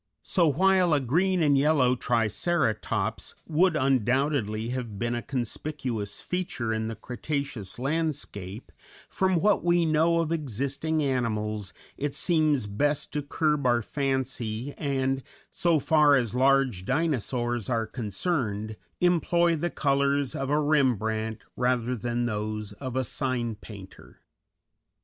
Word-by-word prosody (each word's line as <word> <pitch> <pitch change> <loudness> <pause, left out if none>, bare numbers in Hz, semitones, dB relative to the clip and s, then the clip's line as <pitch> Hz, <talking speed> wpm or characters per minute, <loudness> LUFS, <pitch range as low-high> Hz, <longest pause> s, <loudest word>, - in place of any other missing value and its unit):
So 175 -4 +2
while 180 +2 +4
a - - +3
green 175 +7 +1
and 145 -2 +4
yellow 135 -3 +3
Triceratops 120 - -1
would 170 +2 +3
undoubtedly 130 -4 +1
have 120 -5 -4
been 120 +3 -1
a 120 - -2
conspicuous 125 -4 -4
feature 170 -11 -2
in 110 0 -2
the 115 - -4
Cretaceous 125 -5 -5
landscape, 135 - -3 0.4
from 190 -1 +1
what 205 +3 +3
we 175 -1 +3
know 160 +2 +3
of 165 -1 -1
existing 145 +2 -1
animals 110 -6 -1 0.3
it 145 0 -3
seems 155 - +2
best 145 +9 -1
to 150 - -1
curb 150 -1 0
our 120 -1 +3
fancy 130 -2 -2
and, 135 -2 -1 0.3
so 170 -2 +2
far 150 0 +4
as 120 -5 0
large 130 -6 +3
Dinosaurs 120 - -1
are 115 -2 +1
concerned, 110 - -2 0.2
employ 175 -1 +3
the 170 +3 -1
colors 140 -2 +1
of 135 0 -3
a 150 +1 +3
Rembrandt 110 -7 +1 0.2
rather 125 0 +1
than 120 +1 -2
those 105 -1 -3
of 130 +3 -6
a 130 - +1
sign 125 -2 -1
painter. 100 -2 -12
130 Hz, 125 wpm, -27 LUFS, 115-155 Hz, 0.4 s, while